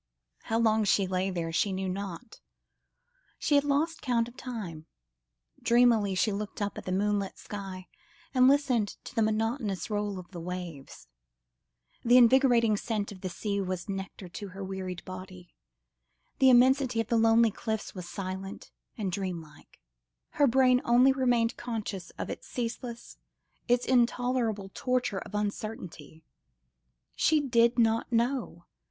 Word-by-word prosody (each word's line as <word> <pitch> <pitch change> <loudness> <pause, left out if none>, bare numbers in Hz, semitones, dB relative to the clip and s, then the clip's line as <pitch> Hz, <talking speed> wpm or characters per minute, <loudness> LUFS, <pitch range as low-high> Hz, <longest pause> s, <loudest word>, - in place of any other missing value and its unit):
How 225 - 0
long 220 -1 +3
she 200 0 +3
lay 185 +1 -1
there 170 -3 -3
she 195 +5 +1
knew 190 0 -2
not. 195 +4 -6 1.0
She - - -1
had 285 -1 +5
lost 295 +3 0
count 235 -3 +1
of 240 - -13
time; 205 -12 -7 0.7
dreamily 235 -5 +4
she 210 +3 +2
looked 205 +1 -5
up 205 -1 -2
at - - -8
the 185 - -3
moonlit 200 +1 0
sky, 195 -3 -7 0.5
and 255 -1 +5
listened 260 -7 +2
to - - -10
the 230 - +1
monotonous 220 -1 -1
roll 205 -1 -1
of 180 0 -10
the 175 - -7
waves. 170 - -7 1.0
The 245 +1 +6
invigorating 240 -3 +5
scent 210 -2 -3
of 190 -2 -11
the 185 - -3
sea 200 +2 -2
was 185 -1 -4
nectar 195 -1 -6
to 200 +4 -7
her 195 +1 -8
wearied 185 -2 -5
body, 185 -1 -10 0.9
the 265 - +6
immensity 255 0 +4
of 225 0 -1
the 235 - +2
lonely 225 0 +5
cliffs 220 +1 -4
was 180 -2 -8
silent 190 0 -6 0.3
and 200 -4 -2
dreamlike. 175 -5 -6 0.5
Her 285 - +3
brain 255 0 +4
only 245 +3 +5
remained 245 -3 +1
conscious 215 -6 -5
of - - -4
its - - -8
ceaseless, 235 -1 -5 0.5
its 245 0 +2
intolerable 240 -5 +1
torture 250 -6 -1
of 210 - -9
uncertainty. 200 -7 -5 0.9
She 310 -1 +3
did 235 -4 +3
not 225 +1 +2
know! 235 -7 -1
215 Hz, 145 wpm, -29 LUFS, 190-245 Hz, 1.0 s, The